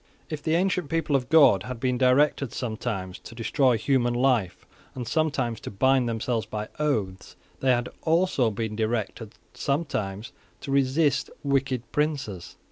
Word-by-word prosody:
If 155 -1 -4
the 160 +1 +1
ancient 180 -3 0
people 165 -3 0
of 125 -2 0
God 145 - +6
had 125 +3 -6
been 125 0 0
directed 135 0 +3
sometimes 110 -6 -4
to 115 - -12
destroy 120 +2 +2
human 120 0 +1
life, 120 -7 +1 0.3
and 125 -3 -5
sometimes 130 -6 0
to - - -7
bind 130 +4 +2
themselves 115 0 -2
by 110 -1 -5
oaths, 110 -11 -2 0.2
they 135 - +1
had 120 -1 +2
also 160 -7 +2
been 110 0 -4
directed 110 0 -3 0.2
sometimes 115 -8 -2 0.3
to 140 - -5
resist 140 +1 +2
wicked 135 -3 0
princes. 140 - -2
125 Hz, 145 wpm, -26 LUFS, 110-140 Hz, 0.3 s, God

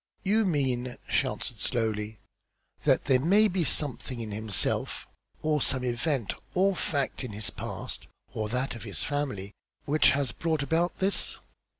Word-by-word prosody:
"You 210 +3 +3
mean," 130 -6 0
she - - +2
answered - - -4
slowly, 110 -2 -1 0.7
"that - - +4
there 130 -2 +4
may 200 +10 +5
be 185 -3 0
something 135 -4 0
in 110 -2 -4
himself 105 -2 0 0.4
or 150 -2 +2
some 130 -1 +2
event 125 -1 0 0.2
or 195 +1 +4
fact 140 -4 -1
in 120 -4 -5
his 105 0 -2
past, - - -5 0.3
or 110 -1 -2
that 125 +3 -1
of 115 - -8
his 100 -3 -3
family, 130 -9 -2 0.3
which 155 +2 +5
has 135 -2 +1
brought 160 -3 -1
about 165 +4 +1
this?" 195 +1 +2
135 Hz, 155 wpm, -29 LUFS, 115-160 Hz, 0.7 s, may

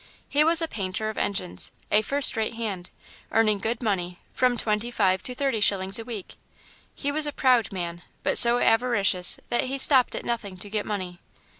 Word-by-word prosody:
He 295 +1 +2
was 330 +1 +4
a - - -1
painter 210 -3 -4
of - - -15
engines, 90 - -3 0.2
a 210 - +4
first 275 +6 +3
rate 220 0 -2
hand, 200 -6 -5 0.4
earning 215 -2 +2
good 230 +4 -3
money, 180 -5 -2 0.2
from 250 -1 +1
twenty 215 +1 -2
five 190 -5 +1
to 250 - -4
thirty 270 -4 -1
shillings 195 0 +2
a - - -6
week. 225 -5 -8 0.6
He 285 - -3
was 300 +1 +2
a - - -2
proud 250 -6 +2
man, 175 -2 -6 0.2
but - - +4
so 235 0 +6
avaricious 225 -7 +2
that 240 - 0
he 270 +2 -3
stopped 265 -2 +4
at - - -6
nothing 215 -5 -4
to 200 +2 -8
get 210 -1 -3
money. 185 -4 -5
220 Hz, 190 wpm, -25 LUFS, 190-250 Hz, 0.6 s, so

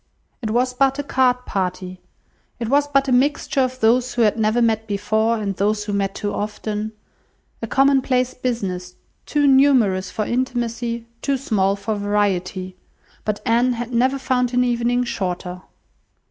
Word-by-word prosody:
It 220 - -3
was 250 +3 +1
but 270 +1 +2
a 285 - -2
card 250 -2 +1
party, 185 -1 -3 0.6
it 230 -2 -3
was 285 +2 +3
but 275 -1 +2
a - - 0
mixture 275 +2 +2
of 255 0 -1
those 245 +3 +2
who 240 - +3
had 210 - +3
never 220 +1 +1
met 225 -2 +1
before, 215 +3 0
and 200 -3 -3
those 210 +2 0
who 205 0 -4
met 195 -1 -1
too 205 - -3
often; 210 +1 -4 0.7
a 230 - -3
commonplace 265 0 +2
business, 185 -8 -3 0.3
too 295 -1 +1
numerous 260 -9 +4
for 215 - -3
intimacy, 235 -1 -2 0.2
too 275 -1 0
small 200 -7 +1
for 210 +2 -3
variety; 195 -3 -1 0.5
but 210 -1 -2
Anne 240 +2 +3
had 240 +1 -5
never 260 +3 +2
found 250 -2 0
an 250 - +4
evening 245 0 +1
shorter. 180 -5 -4
230 Hz, 160 wpm, -21 LUFS, 205-255 Hz, 0.7 s, numerous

